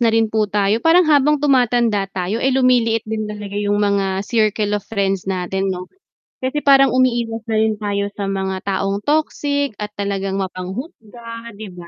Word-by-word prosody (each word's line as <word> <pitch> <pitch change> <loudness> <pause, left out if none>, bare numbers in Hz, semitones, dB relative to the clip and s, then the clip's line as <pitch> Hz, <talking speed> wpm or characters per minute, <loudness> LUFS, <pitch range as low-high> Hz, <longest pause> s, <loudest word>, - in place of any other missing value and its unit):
na 235 - +4
rin 225 -1 +2
po 215 -2 +1
tayo 205 +2 +1
parang 335 +2 +5
habang 300 -1 +4
tumatanda 240 -7 +2
tayo 190 +5 -2
ay 265 - +2
lumiliit 245 -4 +2
din 215 -1 -3
talaga 210 -1 -7
yung 205 0 0
mga 195 -1 0
circle 215 -2 +1
of 205 - -7
friends 195 -3 -1
natin, 190 +1 -1
'no? 180 0 -5 0.6
Kasi 260 +3 -1
parang 275 -2 +5
umiiwas 235 -3 +1
na 225 - -1
rin 220 0 +2
tayo 200 -1 -1
sa 200 - -4
mga 190 -1 -2
taong 195 +1 -1
toxic 285 -3 0
at 210 0 -4
talagang 195 -1 -2
mapanghusga, 230 - -7
'di 215 - -6
ba? 175 -1 -10
215 Hz, 170 wpm, -19 LUFS, 195-245 Hz, 0.6 s, parang